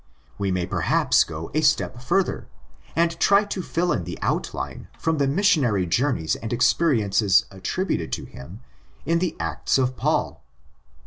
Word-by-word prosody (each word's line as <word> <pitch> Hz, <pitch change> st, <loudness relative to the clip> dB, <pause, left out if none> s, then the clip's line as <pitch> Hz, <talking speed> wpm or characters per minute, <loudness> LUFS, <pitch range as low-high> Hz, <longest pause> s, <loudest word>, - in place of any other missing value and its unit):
We 100 Hz, -, -1 dB
may 90 Hz, -1 st, -1 dB
perhaps -, -, +2 dB
go 80 Hz, 0 st, -7 dB
a 155 Hz, -, +1 dB
step 140 Hz, -4 st, +1 dB
further, 190 Hz, +9 st, 0 dB, 0.5 s
and 170 Hz, 0 st, +1 dB
try 200 Hz, +1 st, +5 dB
to 205 Hz, -2 st, -4 dB
fill 175 Hz, 0 st, -1 dB
in 90 Hz, -, -1 dB
the -, -, -6 dB
outline -, -, -3 dB
from 160 Hz, -2 st, -1 dB
the 140 Hz, -, +2 dB
missionary 140 Hz, -, +2 dB
journeys 90 Hz, -, 0 dB
and 115 Hz, -, -6 dB
experi 125 Hz, 0 st, +2 dB
ences 100 Hz, -1 st, +3 dB
attributed 95 Hz, -, -3 dB
to -, -, -3 dB
him 85 Hz, -, -11 dB, 0.4 s
in 165 Hz, 0 st, +2 dB
the 175 Hz, -2 st, -1 dB
Acts -, -, 0 dB
of 130 Hz, -1 st, 0 dB
Paul. -, -, -1 dB
130 Hz, 155 wpm, -23 LUFS, -, 0.5 s, try